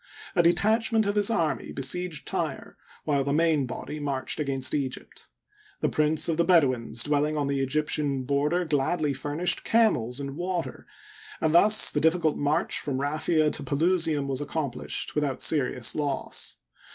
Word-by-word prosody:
A - - +5
detachment 220 +5 +2
of 205 - 0
his 205 0 +3
army 165 -9 -1
besieged 170 +3 -1
Tyre, - - -4 0.3
while 140 -3 0
the 140 - -2
main 155 -3 +2
body 150 +4 -6
marched 140 -1 -3
against 135 -3 -1
Egypt, 135 -3 -5 0.5
The - - +1
prince 155 0 +1
of 165 -2 -1
the 170 - +3
Bedouins 130 -10 +2
dwelling 150 +1 0
on 145 - 0
the 140 0 -1
Egyptian 140 0 -1
border 145 +6 0
gladly 150 0 0
furnished 150 +6 -1
camels 140 - +1
and 140 -1 -5
water, 175 +1 -4 0.5
and 160 0 0
thus 210 +5 +6
the 150 - -1
difficult 160 -1 +2
march 145 +1 0
from 135 -2 -3
Raphia 155 +2 +1
to - - -4
Pelusium 160 -1 +1
was 135 0 -2
accomplished 145 -3 -3
without 145 -3 -1
seri 145 -6 +2
ous 120 - +1
loss. 145 -3 -3
150 Hz, 155 wpm, -26 LUFS, 140-170 Hz, 0.5 s, thus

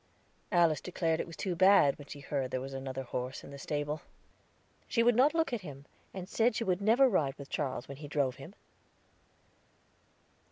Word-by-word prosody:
Alice 170 -4 +3
declared 165 -3 -1
it - - -3
was 165 - -10
too 185 -3 -2
bad, 185 -6 +6
when 145 - -11
she 145 - -9
heard 140 -2 -2
there 130 - -2
was 135 +1 -6
another 135 0 -4
horse 125 +1 -5
in - - -11
the 140 - -9
stable. 145 +1 -3 0.9
She 230 - +2
would 240 0 +4
not 280 +6 +4
look 320 -5 +1
at 235 - -2
him, 140 -5 -10 0.3
and 185 -1 -7
said 225 +3 +2
she 230 - -1
would 185 -2 0
never 235 +6 +5
ride 150 - +1
with 140 -1 -10
Charles 130 -4 -2
when 140 - -8
he 145 0 -8
drove 140 -3 0
him. 160 +9 -11
150 Hz, 195 wpm, -31 LUFS, 135-200 Hz, 0.9 s, bad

